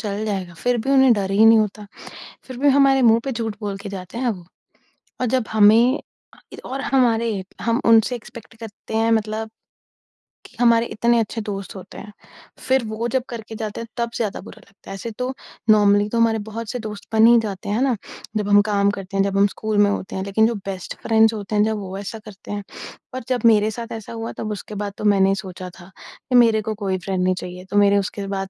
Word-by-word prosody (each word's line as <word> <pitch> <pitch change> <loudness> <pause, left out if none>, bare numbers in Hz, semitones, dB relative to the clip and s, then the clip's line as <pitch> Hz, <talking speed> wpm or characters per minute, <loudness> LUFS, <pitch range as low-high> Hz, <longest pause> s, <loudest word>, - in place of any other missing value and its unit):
चल 210 0 -3
जाएगा 190 -5 -4
फिर 245 +7 0
भी 265 - -2
उन्हें 265 -2 +6
डर 195 -3 -1
ही 205 +3 +4
नहीं 225 0 +7
होता, 210 -1 -2 0.6
फिर 255 -2 -9
भी 285 +2 +3
हमारे 270 -1 +4
मुँह 230 -1 +5
पे 270 - -2
झूठ 225 -3 -4
बोल 205 -2 -4
के 200 +1 -8
जाते 190 +2 -7
हैं 250 -2 0
वो 180 -5 -7 0.8
और - - +2
जब 245 -4 -1
हमें 220 +5 +5 0.3
अ, - - -19 0.2
इ - - -9
और 270 +1 -4
हमारे 230 -6 +1 0.2
हम 235 +2 +1
उनसे 230 +2 +4
एक्सपेक्ट 225 -1 -12
करते 220 -1 -8
हैं 225 0 +2
मतलब 220 0 -1 1.0
कि - - -16
हमारे 235 -1 +4
इतने 235 +1 +1
अच्छे 225 0 -2
दोस्त 200 -2 -6
होते 190 -1 -11
हैं, 210 - -10 0.5
फिर 260 -1 +1
वो 220 +2 -3
जब 255 +1 0
करके 225 -2 -7
जाते 215 0 -5
हैं 230 - -7
तब 235 0 -1
ज़्यादा 215 -4 -3
बुरा - - -13
लगता 200 -1 -18
है, - - -5
ऐसे 225 +4 -6
तो 250 +1 -2 0.4
नॉर्मली 205 -1 +5
तो 235 - -2
हमारे 225 -1 +3
बहुत 230 0 -6
से 250 - -4
दोस्त 210 -2 -8
बन 220 0 +6
ही 235 0 +7
जाते 200 0 -5
हैं, 205 - 0
है 250 - 0
ना? 265 -3 +2 0.4
जब 205 -1 -2
हम 205 0 +6
काम 200 -1 +1
करते 195 0 -6
हैं, 195 - +4
जब 195 0 -1
हम 200 +1 +5
स्कूल 215 +1 -3
में 205 0 +5
होते 200 - -4
हैं, 190 - -3
लेकिन 220 +3 +3
जो 235 - -2
बेस्ट 190 -2 -6
फ्रेंड्स 225 0 +4
होते 210 -1 -5
हैं 210 - +4
जब 220 0 0
वो 195 -1 -6
ऐसा 205 +3 -6
करते 200 -2 -11
हैं 205 0 -4 0.5
और 255 - -5
जब 250 -1 0
मेरे 215 -1 +5
साथ 230 +1 -7
ऐसा 225 0 -7
हुआ 225 0 -5
तब 215 - -4
उसके 210 +1 -7
बाद 205 -1 -4
तो - - -7
मैंने 195 -1 +4
सोचा 185 -2 -7
था 175 +2 -14
कि 255 - -6
मेरे 225 -3 +5
को 215 +1 -3
कोई 195 -2 -2
फ्रेंड 185 0 -2
नहीं 185 0 +2
चाहिए। 180 0 -8
तो 205 - 0
मेरे 200 0 +5
उसके 200 0 -3
बाद 195 -1 -3
215 Hz, 235 wpm, -21 LUFS, 200-230 Hz, 1.0 s, नहीं